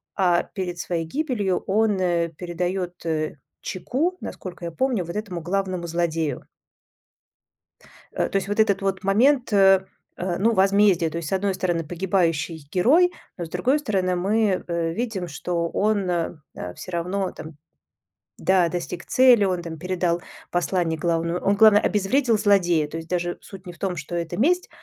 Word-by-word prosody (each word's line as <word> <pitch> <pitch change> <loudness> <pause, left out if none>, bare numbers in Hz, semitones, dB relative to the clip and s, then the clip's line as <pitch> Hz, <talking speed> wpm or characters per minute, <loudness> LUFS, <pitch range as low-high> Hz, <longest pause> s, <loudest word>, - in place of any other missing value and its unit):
а 180 -3 +3
перед 180 -3 -5
своей 170 -2 -2
гибелью 210 - -1
он, 210 0 +2
э, 170 -2 +1
передает, 180 +2 -4
э, 155 -1 -1 0.3
чеку, 285 - -2
насколько 180 -2 -7
я 170 - -4
помню, 235 -2 0
вот 170 - -7
этому 200 -5 -4
главному 185 0 -2
злодею. 165 -2 -1 1.7
Э, - - -1
то - - -8
есть 195 - -2
вот 205 +2 -2
этот 200 -3 +3
вот 195 0 -1
момент, 245 +6 +3
э, 195 -1 +5 0.3
э, 180 -1 -2
ну, 225 +4 +2
возмездия: 195 -3 +4
то 165 - -5
есть 160 -3 -4
с - - -3
одной 195 0 +1
стороны 175 -3 -1
погибающий 165 -3 -1
герой, 310 - +4 0.3
но 170 - -4
с - - -11
другой 255 - +1
стороны 190 -9 0
мы, 200 +1 +1
э, 170 -1 -1
видим, 220 -6 -3
что 170 +3 -2
он, 205 -3 0
э, 170 -2 -1 0.4
всё 185 - -9
равно 180 +3 -2
там 155 -2 -10 0.8
да, 185 -3 +3
достиг 175 0 -5
цели, 250 -5 +5
он 180 -2 0
там 160 -1 -7
передал 175 0 -1 0.3
послание 175 -2 0
главному 170 +1 0
он, 200 - +1
главное, 210 0 +7
обезвредил 225 +4 +2
злодея. 180 -7 +3
То 160 - -7
есть 165 0 -7
даже 175 -1 -2
суть 195 -2 -12
не 180 - -8
в 170 - -18
том, 190 0 -2
что 155 +3 -5
это 170 -1 -3
месть, 355 +9 +2
185 Hz, 165 wpm, -24 LUFS, 170-200 Hz, 1.7 s, главное